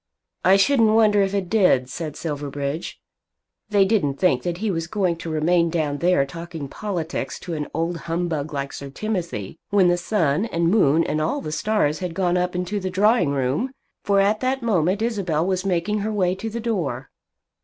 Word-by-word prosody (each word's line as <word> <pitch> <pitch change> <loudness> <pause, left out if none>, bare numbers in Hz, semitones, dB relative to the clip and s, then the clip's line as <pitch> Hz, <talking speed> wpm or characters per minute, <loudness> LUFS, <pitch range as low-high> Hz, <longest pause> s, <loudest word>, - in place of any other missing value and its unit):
"I 190 +1 +6
shouldn't 225 0 +4
wonder 210 -2 +5
if 195 0 0
it 195 -2 -1
did," 180 - +3
said 155 +2 -5
Silverbridge. 145 0 -4 0.7
They 200 -2 +4
didn't 190 -10 +1
think 140 -6 +2
that 175 +2 -3
he 210 +2 -1
was 165 -2 -2
going 185 -3 0
to 165 - -6
remain 170 +2 +2
down 150 -4 -1
there 175 -5 +3
talking 165 0 -7
politics 175 -1 -4
to 175 - -5
an 150 -2 -3
old 165 +1 -2
humbug 165 -3 -2
like 140 -1 -4
Sir 140 - -7
Timothy 165 - -4
when 195 -3 +4
the 175 - +2
sun, 175 -2 +1
and 170 -4 +1
moon, 165 -6 +4
and 155 - -1
all 155 - 0
the 155 - -5
stars 160 -4 0
had 180 -3 -4
gone 180 -1 +1
up 180 0 0
into 180 +3 -2
the 185 -1 -3
drawing 205 -1 +3
room! 140 - -1 0.3
For 200 -1 +3
at 205 +2 +2
that 260 0 -1
moment 195 -1 +1
Isabel 185 -9 0
was 185 0 -1
making 185 +3 0
her 215 +2 -2
way 185 -4 +1
to 200 +4 -5
the 230 +2 -4
door. 170 - -3
175 Hz, 190 wpm, -23 LUFS, 155-205 Hz, 0.7 s, I